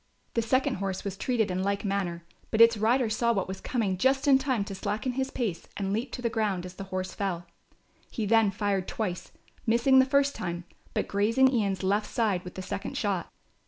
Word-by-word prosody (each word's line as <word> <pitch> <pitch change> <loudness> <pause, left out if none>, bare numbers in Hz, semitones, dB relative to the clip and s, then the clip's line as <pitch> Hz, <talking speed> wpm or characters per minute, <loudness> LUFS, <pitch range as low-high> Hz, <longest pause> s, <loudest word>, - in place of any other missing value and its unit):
The 230 - +2
second 255 +1 +1
horse 195 -1 -3
was 200 -2 -4
treated 220 -1 0
in 180 +1 -1
like 200 +2 -1
manner; 180 -4 -2 0.2
but 220 - -1
its 230 0 +8
rider 230 +4 +2
saw 235 +2 +1
what 195 -4 -1
was 190 0 -6
coming 205 -7 -1
just 270 +4 +2
in 270 -1 +7
time 260 -6 0
to 200 - -7
slacken 210 +6 -2
his 265 +1 -2
pace 215 -12 -3
and 195 -1 -1
leap 235 +4 -2
to 245 - -5
the - - +2
ground 205 -5 -1
as 180 - -8
the 195 +1 -7
horse 185 -1 -4
fell. 180 -4 -3 0.6
He 220 - -3
then 225 0 +4
fired 195 -1 -1
twice, 185 -5 -3 0.4
missing 240 +4 +5
the 260 - +6
first 280 +1 +2
time, 175 -1 -4 0.3
but - - 0
grazing 230 +7 +3
Ian's 200 -5 0
left 205 +3 +1
side 205 -6 0
with 180 - -9
the 185 - -5
second 200 +1 -4
shot. 200 -5 -1
205 Hz, 210 wpm, -28 LUFS, 190-235 Hz, 0.6 s, its